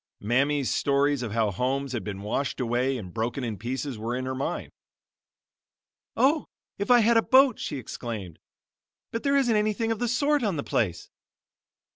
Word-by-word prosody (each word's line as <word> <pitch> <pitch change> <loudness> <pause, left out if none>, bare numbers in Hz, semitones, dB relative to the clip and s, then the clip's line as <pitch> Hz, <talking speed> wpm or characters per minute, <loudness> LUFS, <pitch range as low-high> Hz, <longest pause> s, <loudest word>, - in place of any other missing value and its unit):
Mammy's 135 +5 +1
stories 140 -1 +2
of 120 -4 -4
how 110 -2 +1
homes 130 +6 -1
had 120 -3 -3
been 100 -2 -6
washed 135 +8 -2
away 125 +2 0
and 95 -6 -8
broken 120 +4 -2
in 115 -3 -2
pieces 130 +2 -4
were 115 +3 -2
in 130 0 -3
her 130 - -2
mind. 135 +2 -3 1.5
"Oh, 290 +3 +3 0.3
if 200 - -2
I 245 -1 +7
had 230 +1 +4
a - - +6
boat!" 260 0 +5
she 145 - -4
exclaimed. 110 -8 -6 0.7
"But 230 - -3
there 280 0 +2
isn't 245 -5 +3
anything 215 +2 +1
of 225 - -2
the 245 - 0
sort 285 +4 +2
on 205 -7 0
the 140 - -3
place." 90 -7 -1
135 Hz, 175 wpm, -26 LUFS, -, 1.5 s, I